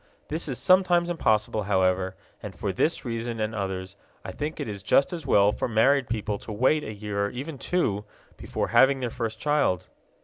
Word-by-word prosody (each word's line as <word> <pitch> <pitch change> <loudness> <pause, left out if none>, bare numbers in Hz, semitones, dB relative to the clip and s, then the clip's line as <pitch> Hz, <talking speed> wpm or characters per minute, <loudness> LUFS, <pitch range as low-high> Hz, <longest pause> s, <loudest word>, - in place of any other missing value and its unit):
This 160 +2 -2
is 130 - -3
sometimes 180 -2 +3
impossible, 110 -9 +1
however, 95 -1 +1 0.3
and 105 -3 -8
for 100 -2 -3
this 155 - 0
reason 115 -1 -3
and 110 +1 -1
others 95 -2 -4 0.3
I 95 - -5
think 150 +8 -5
it - - -3
is 100 -2 -6
just 135 - +3
as 165 -5 -6
well 100 -4 +5
for - - -2
married 130 +3 +3
people 105 -2 -2
to - - -9
wait 130 +8 +2
a - - -5
year 100 -1 -2
or - - -5
even 140 +4 -6
two 105 - 0 0.3
before - - -3
having 135 0 +5
their 120 -2 -2
first 115 -2 -4
child. 145 - +1
110 Hz, 195 wpm, -26 LUFS, 100-140 Hz, 0.3 s, well